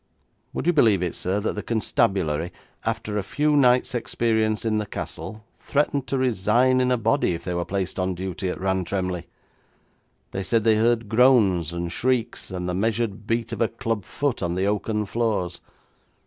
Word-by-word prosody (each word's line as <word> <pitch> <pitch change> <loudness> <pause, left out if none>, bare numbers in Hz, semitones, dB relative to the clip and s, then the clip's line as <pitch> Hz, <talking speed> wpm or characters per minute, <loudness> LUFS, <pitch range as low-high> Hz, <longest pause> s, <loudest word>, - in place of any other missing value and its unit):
Would - - -3
you 175 - +4
believe 110 - +4
it, 90 - -1
sir, 95 +3 -1
that 110 - -1
the 105 - -4
constabulary, 95 -8 0 0.3
after 105 -1 -2
a - - -3
few 150 +8 +1
nights' 125 -1 +4
experience 110 -2 0
in 110 -1 +1
the 105 - -3
castle, 110 +2 -6
threatened 140 -2 0
to 135 - -1
resign 125 +1 +3
in 125 - +2
a 125 - +3
body 115 -5 +1
if 85 - -8
they 90 - -3
were 85 0 -1
placed 95 -1 -3
on 95 0 0
duty 95 +1 -3
at - - -4
Rantremly? 95 -1 -1 1.0
They 95 - -3
said 115 +3 +1
they 110 -1 +4
heard 115 0 +2
groans 110 - +4
and 85 0 -3
shrieks, 125 +4 -1
and 90 -1 -4
the 90 - -1
measured 110 +1 -1
beat 115 0 -1
of 115 - -4
a 115 - +4
club 115 -3 -3
foot 140 +6 -2
on 85 -1 -1
the 95 +1 0
oaken 105 +1 0
floors. 100 -6 -1
105 Hz, 180 wpm, -24 LUFS, 95-120 Hz, 1.0 s, you